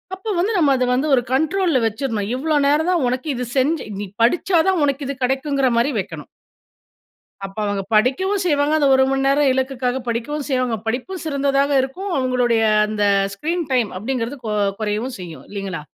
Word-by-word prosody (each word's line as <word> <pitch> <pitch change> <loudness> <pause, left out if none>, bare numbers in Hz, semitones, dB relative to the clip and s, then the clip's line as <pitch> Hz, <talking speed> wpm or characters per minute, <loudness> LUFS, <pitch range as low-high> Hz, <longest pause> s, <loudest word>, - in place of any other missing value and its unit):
அப்ப 400 +2 -4
வந்து 390 +6 +1
நாம 290 -5 +4
அத 255 -1 +1
வந்து 265 +5 0
ஒரு 245 - +2
கண்ட்ரோல்‌ல 320 +1 +2
வச்சுர்ணும். 220 -2 -3
இவ்ளோ 305 +4 -1
நேரம் 305 +4 +2
தான் 345 -5 +1
உனக்கு, 255 +4 -2
இது 250 0 -3
செஞ்சி 290 +3 +1
நீ 205 - -3 0.2
படிச்சா 345 +7 +2
தான் 370 -4 +1
உனக்கு 280 0 -1
இது 280 - -3
கிடைக்குங்கறமாரி 265 -1 +1
வைக்கனும். 190 - -7 1.2
அப்ப 195 - -10
அவுங்க 205 -1 -2
படிக்கவும் 370 - +2
செய்வாங்க. 295 -2 +2
அந்த 285 - +3
1 265 - +4
மணி 270 0 0
நேரம் 275 0 +3
இலக்குக்காக 260 -1 -1
படிக்கவும் 265 +6 -3
செய்வாங்க. 255 -3 0
படிப்பும் 270 +11 -3
சிறந்ததாக 280 -1 +1
இருக்கும். 360 +10 -5
அவுங்களுடைய 250 -3 +1 0.3
அந்த 215 -1 -2 0.3
ஸ்கிரீன் 335 - -2
டைம் 240 -6 +1
அப்பிடிங்கிறது 250 +4 -3
கொ 215 - -2 0.3
கொறையவும் 215 +4 -2
செய்யும். 170 -3 -9
இல்லிங்களா! 195 -5 -5
265 Hz, 165 wpm, -20 LUFS, 240-300 Hz, 1.2 s, நாம